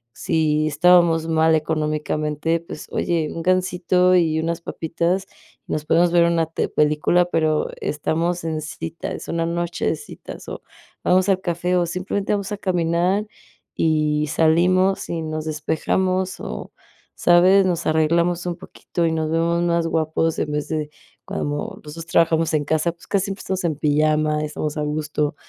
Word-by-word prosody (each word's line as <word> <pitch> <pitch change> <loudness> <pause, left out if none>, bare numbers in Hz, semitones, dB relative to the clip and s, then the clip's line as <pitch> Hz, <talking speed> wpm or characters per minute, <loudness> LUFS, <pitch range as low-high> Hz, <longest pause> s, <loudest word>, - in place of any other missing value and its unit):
si 155 -1 +1
estábamos 165 +1 +4
mal 160 0 +3
económicamente, 155 0 -1
pues: 165 -2 -9
"Oye, 165 -3 0
un 165 - -5
gansito 180 0 +2
y 160 -3 +2
unas 165 +1 -2
papitas, 170 +3 -2 0.4
nos 150 0 -3
podemos 170 +2 +3
ver 170 -1 +5
una 170 -1 +2
te 165 - -2
una - - -8
película", 150 +4 +3
pero 155 -3 0
estamos 165 +4 -1
en 160 -1 -2
cita, 160 +2 -6
es - - -7
una 165 0 0
noche 170 +1 -2
de - - +1
citas, 435 - -10
o - - -7 0.4
vamos 185 +1 +3
al 190 -1 +2
café, 180 0 -1
o 175 - +2
simplemente 185 +3 -2
vamos 200 0 -2
a - - -3
caminar 180 +2 0 0.5
y 155 -1 +1
salimos 180 +5 +2
y 165 -1 -2
nos 155 0 -4
despejamos 185 +5 -1
o, - - -6 0.4
¿sabes?, 185 +3 +5
nos 170 -2 -1
arreglamos 170 +3 +2
un 175 - -2
poquito 175 -1 -4
y - - +1
nos 160 -1 -1
vemos 170 +1 +1
más 170 -1 +1
guapos 160 0 0
en 150 - -2
vez 150 0 -2
de 155 -2 -2 0.4
cuando 145 0 -4
nosotros 160 +2 -8
trabajamos 165 -1 +2
en 150 -2 +1
casa, 160 +3 +1
pues, 170 - -19
casi 200 -1 0
empezamos 190 -1 -4
en 160 -3 0
pijama, 150 0 +1
estamos 150 0 -3
a - - -1
gusto. 150 0 -2
165 Hz, 160 wpm, -22 LUFS, 155-175 Hz, 0.5 s, ver